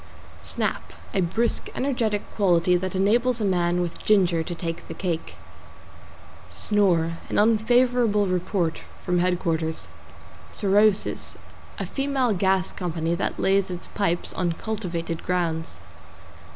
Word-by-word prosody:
=SNAP= - - -2 0.2
A 195 - +2
brisk, 220 +7 0
energetic 230 -6 0
quality 180 -3 +3
that 185 +1 -2
enables 235 +6 +2
a 215 - 0
man 175 -2 +1
with 175 -1 -4
ginger 185 -6 +3
to 175 +2 -5
take 165 0 -5
the - - -7
cake. 170 -4 -3 1.1
=SNORE= 170 -6 +1
An - - -1
unfavorable 230 0 +3
report 180 -2 -1 0.2
from 180 -1 +1
headquarters. 165 -3 0 0.6
=SOROSIS= 205 0 +1 0.4
A - - -3
female 270 -4 0
gas 190 0 +1
company 165 -2 -2
that 170 - -2
lays 195 0 +2
its 180 -1 -5
pipes 175 -4 -1
on 175 -2 0
cultivated 170 -5 -4
grounds. 170 -3 -2
185 Hz, 120 wpm, -25 LUFS, 170-210 Hz, 1.1 s, quality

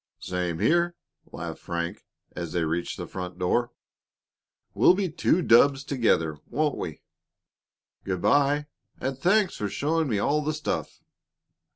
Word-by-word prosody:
"Same 90 -2 -3
here," 170 - +2 0.4
laughed - - -6
Frank, 85 +3 -4 0.3
as 85 -2 -5
they 85 -2 +1
reached 80 +2 -2
the - - -5
front 90 -1 -6
door. 120 +7 +1 1.0
"We'll 180 - +5
be 190 -3 -1
two 165 +2 +2
dubs 135 +3 +5
together, 95 - +1
won't 150 +3 0
we? 80 -3 -6 1.0
Good 95 -2 -2
by, 145 +1 +3 0.3
and 135 +1 -2
thanks 185 +7 +2
for 105 - -2
showing 155 +6 0
me 110 - +1
all 145 +9 +1
the 155 +1 -1
stuff." 155 0 -4
130 Hz, 140 wpm, -26 LUFS, -, 1.0 s, We'll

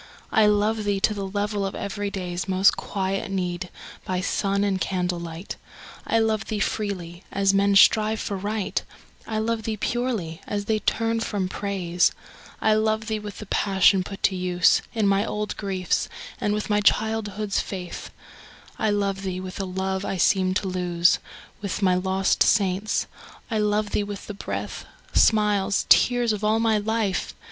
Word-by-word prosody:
I 220 -3 +5
love 210 +1 +2
thee 205 -1 0
to 215 - +3
the 200 -2 -4
level 205 +1 -2
of 195 - -3
every 205 0 -3
day's 180 -2 -4
Most 190 +1 +4
quiet 195 0 -3
need, 180 -1 -2 0.3
by 185 -1 -2
sun 200 +1 0
and 195 -2 0
candlelight. 175 -1 -3 0.5
I 225 - +2
love 220 -1 +1
thee 215 - -3
freely, 190 -4 -3
as 195 0 +2
men 200 0 +3
strive 215 +2 +5
for 200 - -3
Right; 205 +1 -2 0.5
I 220 - -2
love 225 +1 0
thee 220 0 -3
purely, 220 -9 -2
as 205 -1 -2
they 215 0 +1
turn 230 +1 0
from 205 -4 -2
Praise; 185 -3 0 0.5
I 215 - +3
love 220 0 +1
thee 220 -1 -2
with 210 -1 -8
the 215 - -7
passion 195 -1 +3
put 195 +2 -9
to 190 - +3
use 180 -1 +3
In 215 -3 +2
my 195 +1 +3
old 210 -1 -3
griefs, 190 -3 -1 0.3
and 205 - 0
with 210 - -3
my 210 -1 +2
childhood's 215 -1 +1
faith; 180 -3 -6 0.7
I 220 - +2
love 200 -1 0
thee 185 -2 -3
with 185 0 -7
a 195 - -1
love 190 +1 -2
I 195 - -2
seemed 185 +1 +2
to 195 - 0
lose 180 -1 +2 0.4
With 200 0 -3
my 185 -1 +4
lost 190 +1 +1
saints; 200 0 +2 0.5
I 220 - +1
love 210 0 +1
thee - - +1
with 205 -1 -7
the 210 - -6
breath, 200 - -5 0.3
Smiles, 210 -2 +3
tears, 245 -2 +5
of 210 0 -5
all 215 +1 +3
my 225 -2 +2
life 215 -3 -1
200 Hz, 170 wpm, -24 LUFS, 190-215 Hz, 0.7 s, I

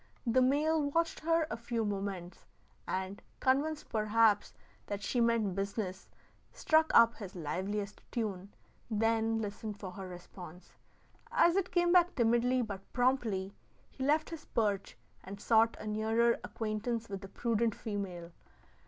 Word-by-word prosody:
The 245 +2 +3
male 300 +5 +3
watched 330 +2 0
her 330 0 +2
a - - -1
few 230 -1 -2
moments 195 -3 -4 0.4
and, 190 +1 -3 0.2
convinced 290 +4 +1
perhaps 215 -1 +3 0.4
that 200 -1 -4
she 240 +4 0
meant 230 -4 +2
business, 195 0 -4 0.4
struck 315 0 +3
up 230 0 +7
his 200 -3 -9
liveliest 195 +5 -3
tune, 200 -4 -3 0.4
then 225 0 +1
listened 210 -1 -5
for 190 -3 -6
her 190 0 -7
response. 180 -1 -11 0.6
As 345 0 +4
it 385 -2 +1
came 350 -1 +2
back 355 0 +5
timidly 240 +1 +2
but 200 -4 -5
promptly, 235 -7 +1 0.4
he 265 - -6
left 305 +4 +2
his 320 -2 -7
perch 205 -4 -1 0.3
and 200 +1 -8
sought 225 +1 +3
a - - -8
nearer 220 +2 +2
acquaintance 225 +1 -3
with 195 -1 -6
the 195 - -8
prudent 230 -1 0
female. 190 -6 -5
220 Hz, 140 wpm, -32 LUFS, 200-250 Hz, 0.6 s, up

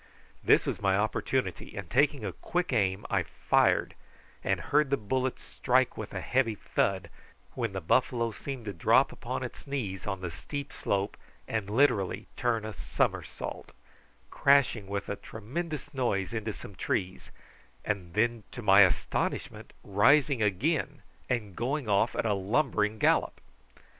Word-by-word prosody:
This - - +5
was - - -3
my 95 -1 +3
opportunity, 105 -1 -1
and 100 -3 -5
taking 140 - +2
a 95 - -3
quick 180 -5 -2
aim 95 -3 +1
I - - +3
fired, - - +2 0.5
and - - +1
heard 150 -1 +2
the 140 - +2
bullet 130 +4 -1
strike - - +1
with - - -6
a - - -4
heavy 125 -4 +1
thud, 100 -1 -1 0.4
when 115 -5 -2
the 95 - -3
buffalo 115 +6 +1
seemed 130 +2 -6
to 100 - -4
drop 85 - +4
upon - - -4
its - - -8
knees 110 -10 -4
on 95 -2 -3
the 90 -2 -4
steep 140 - -6
slope, 100 0 -1 0.3
and 110 -3 -2
literally 105 -5 +2
turned 115 -3 0
a 110 - -5
somersault, - - -3 0.6
crashing 140 -7 +3
with 100 0 -3
a 100 - -3
tremendous 150 +9 -6
noise 120 -6 -1
into 110 -1 -2
some 100 - -10
trees; 95 0 -3 0.6
and 90 -5 -3
then, 115 +1 +2
to 120 - -7
my 100 0 +7
astonishment, 90 -3 0
rising 135 +6 +4
again 140 - 0 0.3
and 110 -7 -2
going 135 +2 -2
off 105 +3 +2
at - - -1
a 105 - +2
lumbering 105 +1 +1
gallop. - - +2
110 Hz, 150 wpm, -29 LUFS, 100-130 Hz, 0.6 s, my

